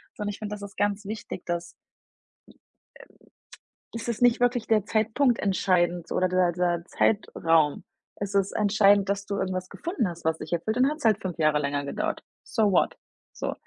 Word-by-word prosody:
So 210 Hz, -, -5 dB
und 205 Hz, -, -2 dB
ich 205 Hz, -, -6 dB
finde, 210 Hz, -1 st, -5 dB
das 205 Hz, -, -10 dB
ist 200 Hz, -1 st, -10 dB
ganz 205 Hz, 0 st, 0 dB
wichtig, 210 Hz, -3 st, -6 dB
dass, 170 Hz, 0 st, -3 dB
hm, -, -, -49 dB, 2.2 s
ähm -, -, -3 dB
es -, -, -7 dB
ist 235 Hz, -1 st, -3 dB
nicht 245 Hz, -1 st, +5 dB
wirklich 245 Hz, -1 st, +1 dB
der 215 Hz, -3 st, +2 dB
Zeitpunkt 225 Hz, +4 st, +2 dB
entscheidend 175 Hz, -3 st, +1 dB
oder 185 Hz, -, +2 dB
der 180 Hz, -1 st, +2 dB
der 175 Hz, -1 st, 0 dB
Zeitraum. 165 Hz, -8 st, +1 dB, 0.3 s
Es 200 Hz, 0 st, -5 dB
ist 195 Hz, 0 st, +2 dB
entscheidend, 200 Hz, -1 st, +4 dB
dass 200 Hz, 0 st, -1 dB
du 200 Hz, -, -2 dB
irgendwas 185 Hz, -1 st, -3 dB
gefunden 325 Hz, -, -2 dB
hast, 170 Hz, -2 st, -8 dB
was 160 Hz, 0 st, +1 dB
dich -, -, -8 dB
erfüllt 215 Hz, +7 st, -1 dB
und 255 Hz, -, +4 dB
dann 275 Hz, -, +3 dB
hat's 305 Hz, -4 st, -9 dB
halt 215 Hz, -2 st, +4 dB
5 180 Hz, -3 st, -4 dB
Jahre 155 Hz, -2 st, +3 dB
länger 145 Hz, 0 st, -2 dB
gedauert. 140 Hz, -, -3 dB, 0.2 s
So 215 Hz, -4 st, +1 dB
what? 180 Hz, -, +2 dB, 0.4 s
So. -, -, -3 dB
200 Hz, 195 wpm, -26 LUFS, 175-215 Hz, 2.2 s, nicht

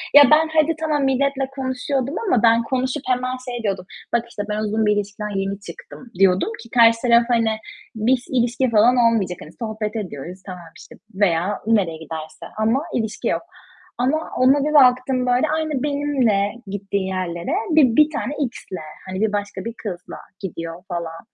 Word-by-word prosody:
Ya, 290 Hz, -, +11 dB
ben 315 Hz, +1 st, +5 dB
hadi, 315 Hz, +1 st, +3 dB
tamam, 305 Hz, -3 st, 0 dB
milletle 270 Hz, 0 st, +1 dB
konuşuyordum 265 Hz, +1 st, -2 dB
ama 245 Hz, -, +2 dB
ben 230 Hz, 0 st, +5 dB
konuşup 260 Hz, +1 st, -2 dB
hemen 255 Hz, 0 st, 0 dB
şey 240 Hz, -1 st, -5 dB
diyordum, 195 Hz, -3 st, -2 dB, 0.3 s
bak, 235 Hz, 0 st, +2 dB
işte, 205 Hz, -, -5 dB
"Ben 210 Hz, 0 st, -1 dB
uzun 215 Hz, +1 st, 0 dB
bir 210 Hz, -, +4 dB
ilişkiden 205 Hz, 0 st, -3 dB
yeni 195 Hz, +1 st, -3 dB
çıktım." 245 Hz, +4 st, -11 dB
diyordum 190 Hz, -, +4 dB
ki 230 Hz, -, -15 dB
karşı 230 Hz, -1 st, +5 dB
taraf, 235 Hz, -1 st, +5 dB
hani 230 Hz, -2 st, +2 dB, 0.4 s
biz 245 Hz, +3 st, +1 dB
ilişki 245 Hz, 0 st, +1 dB
falan 230 Hz, +3 st, +5 dB
olmayacak 220 Hz, -7 st, +2 dB
hani 155 Hz, -, -10 dB
sohbet 220 Hz, -1 st, -4 dB
ediyoruz. 180 Hz, -3 st, -6 dB
Tamam, 180 Hz, -3 st, -9 dB
işte, -, -, -13 dB, 0.2 s
veya 190 Hz, 0 st, +1 dB
nereye 195 Hz, -8 st, +2 dB
giderse 160 Hz, 0 st, -8 dB
ama 225 Hz, +5 st, +2 dB
ilişki 220 Hz, -2 st, -2 dB
yok -, -, 0 dB, 0.6 s
ama 260 Hz, +5 st, +2 dB, 0.2 s
ona 260 Hz, +3 st, +5 dB
bir 305 Hz, -, -1 dB
baktım, 255 Hz, -2 st, +4 dB
böyle 250 Hz, +4 st, +2 dB
aynı 310 Hz, -4 st, -2 dB
benimle 270 Hz, -9 st, +1 dB, 0.2 s
gittiği 195 Hz, 0 st, -3 dB
yerlere 185 Hz, -, -3 dB, 0.2 s
bir 260 Hz, -7 st, +5 dB
bir 305 Hz, 0 st, +6 dB
tane 295 Hz, -2 st, -3 dB, 0.2 s
X'le, 185 Hz, -8 st, -9 dB, 0.2 s
hani, 185 Hz, +1 st, -4 dB
bir 220 Hz, -1 st, +1 dB
başka 205 Hz, -2 st, -3 dB
bir 230 Hz, -, -4 dB
kızla 180 Hz, -5 st, -6 dB, 0.2 s
gidiyor 165 Hz, -2 st, -6 dB
falan. 170 Hz, -3 st, -5 dB
230 Hz, 170 wpm, -21 LUFS, 195-260 Hz, 0.6 s, Ya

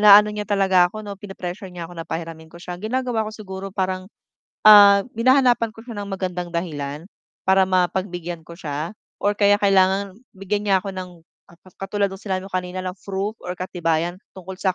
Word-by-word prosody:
naano 210 Hz, 0 st, +8 dB
niya 210 Hz, 0 st, -5 dB
talaga 190 Hz, -3 st, +4 dB
ako 215 Hz, +3 st, -8 dB
'no, 205 Hz, -, -6 dB
pine-pressure 195 Hz, -1 st, -7 dB
niya 180 Hz, -2 st, -7 dB
ako -, -, -12 dB
na 165 Hz, -, -7 dB
pahiramin 160 Hz, -1 st, -6 dB
ko 170 Hz, -, -14 dB
siya, 175 Hz, 0 st, -8 dB
ginagawa 230 Hz, 0 st, -1 dB
ko -, -, -7 dB
siguro 195 Hz, -2 st, -7 dB
parang, 185 Hz, -1 st, -2 dB, 0.6 s
ah, 200 Hz, -1 st, +9 dB
hinahanapan 245 Hz, -1 st, +3 dB
ko 225 Hz, -, -14 dB
siya 235 Hz, -, -7 dB
ng 200 Hz, -, -7 dB
magandang 180 Hz, -2 st, -3 dB
dahilan 155 Hz, -2 st, -4 dB, 0.4 s
para 190 Hz, 0 st, +5 dB
mapagbigyan 180 Hz, -2 st, -1 dB
ko 170 Hz, +1 st, -13 dB
siya 150 Hz, 0 st, -4 dB, 0.3 s
or 205 Hz, -, +3 dB
kaya 205 Hz, -1 st, +5 dB
kailangan 195 Hz, 0 st, +3 dB, 0.2 s
bigyan 205 Hz, +2 st, -2 dB
niya 195 Hz, -, +4 dB
ako 200 Hz, -, -4 dB
ng 185 Hz, -1 st, -6 dB, 0.4 s
ang -, -, -18 dB
ka 190 Hz, +1 st, -9 dB
katulad 200 Hz, 0 st, 0 dB
no'ng 195 Hz, -, -8 dB
sinabi 190 Hz, -2 st, -3 dB
mo 195 Hz, -, -10 dB
kanina 185 Hz, 0 st, -3 dB
na 185 Hz, -, -3 dB
proof 195 Hz, +3 st, -4 dB
or 180 Hz, -, -6 dB
katibayan 175 Hz, -1 st, -1 dB, 0.2 s
tungkol 190 Hz, 0 st, -9 dB
sa 190 Hz, -2 st, +1 dB
190 Hz, 190 wpm, -22 LUFS, 180-205 Hz, 0.6 s, ah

